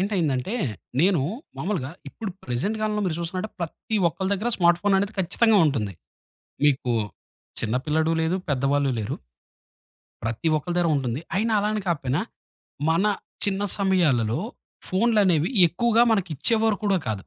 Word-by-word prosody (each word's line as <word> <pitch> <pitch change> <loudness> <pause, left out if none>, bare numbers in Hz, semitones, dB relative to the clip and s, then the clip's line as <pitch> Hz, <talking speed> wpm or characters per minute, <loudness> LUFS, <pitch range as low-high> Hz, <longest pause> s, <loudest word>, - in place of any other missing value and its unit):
ఏంటైందంటే 185 - 0 0.5
నేను 180 -3 +4 0.4
మామూలుగా 165 -8 -2 0.2
ఇప్పుడు 215 -4 -6
ప్రెజెంట్‌ 135 - -1
కాలంలో 215 -1 0
మీరు 165 - -1
చూస్తున్నాంటే 185 +5 -3
ప్రతి 170 +6 -3
ఒక్కల 190 +5 -4
దెగ్గర 210 +4 0
స్మార్ట్ 175 -1 +4
ఫోన్ 205 -1 +3
అనేది 200 +2 -2
ఖచ్చితంగా 210 +4 +3
ఉంటుంది. 110 -9 -1 0.7
మీకు 130 -3 +2 0.7
చిన్న 110 +2 -1
పిల్లాడు 160 +1 +1
లేదు 160 +3 +1
పెద్దవాళ్ళు 140 +1 +1
లేరు. 105 - -3 1.1
ప్రతి 115 +8 -1
ఒక్కల 175 +4 -3
దగర 175 -1 +2
ఉంటుంది, 130 0 -2
అయినా 220 +3 +1
అలాని 210 +1 0
కాకపోయినా, 140 -6 0 0.7
మన 170 +5 +2 0.4
చిన్న 200 0 0 0.2
సమయాలలో 155 - +2 0.5
ఫోనులనేవి 190 -6 +3 0.2
ఎక్కువగా 235 +6 +3
మనకి 195 -5 0
ఇచ్చేవారు 225 - +2
కూడా 195 -2 +3
కాదు, 100 -4 -2
175 Hz, 130 wpm, -24 LUFS, 140-205 Hz, 1.1 s, నేను